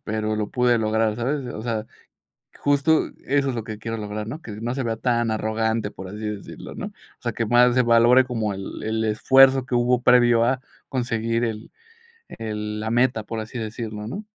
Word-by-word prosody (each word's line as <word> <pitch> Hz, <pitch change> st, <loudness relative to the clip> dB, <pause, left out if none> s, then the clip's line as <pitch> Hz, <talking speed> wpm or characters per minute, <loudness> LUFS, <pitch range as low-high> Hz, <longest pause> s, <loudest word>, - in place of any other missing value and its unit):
pero, 110 Hz, 0 st, -2 dB
lo 105 Hz, -1 st, -2 dB
pude 125 Hz, -1 st, +3 dB
lograr, 110 Hz, 0 st, +1 dB
¿sabes? 130 Hz, +3 st, -2 dB
O 110 Hz, -, -6 dB
sea, 115 Hz, -2 st, -2 dB, 0.7 s
justo 145 Hz, +2 st, +2 dB, 0.2 s
eso 140 Hz, 0 st, +1 dB
es 125 Hz, -, -2 dB
lo 115 Hz, -, -3 dB
que 110 Hz, -1 st, -7 dB
quiero 115 Hz, +1 st, -5 dB
lograr, 105 Hz, 0 st, -5 dB
¿no? 145 Hz, +8 st, -6 dB
Que 110 Hz, -, -8 dB
no 115 Hz, +4 st, -3 dB
se 135 Hz, -, -2 dB
vea 115 Hz, -1 st, -2 dB
tan 120 Hz, -1 st, +1 dB
arrogante, 110 Hz, 0 st, -1 dB
por 95 Hz, 0 st, -9 dB
así 105 Hz, -, -8 dB
decirlo, 105 Hz, -2 st, -7 dB
¿no? -, -, -5 dB
O -, -, -10 dB, 0.3 s
sea, -, -, -2 dB
que 115 Hz, -, -1 dB
más 120 Hz, +2 st, +4 dB
se 125 Hz, -, +4 dB
valore 120 Hz, +2 st, +5 dB
como 115 Hz, -5 st, -2 dB
el 95 Hz, 0 st, -7 dB
el 110 Hz, 0 st, -1 dB
esfuerzo 130 Hz, +4 st, +5 dB
que 125 Hz, -, -2 dB
hubo 120 Hz, 0 st, +2 dB
previo 120 Hz, -2 st, +5 dB
a 130 Hz, +2 st, +1 dB, 0.3 s
conseguir 115 Hz, -2 st, -1 dB
el 110 Hz, -2 st, -4 dB, 0.6 s
el 105 Hz, -1 st, -5 dB
la 110 Hz, +1 st, -3 dB
meta, 120 Hz, -1 st, +2 dB
por 115 Hz, +1 st, -5 dB
así 110 Hz, +2 st, -6 dB
decirlo, 110 Hz, -1 st, -5 dB
¿no? 205 Hz, -, -6 dB
115 Hz, 200 wpm, -23 LUFS, 110-125 Hz, 0.7 s, valore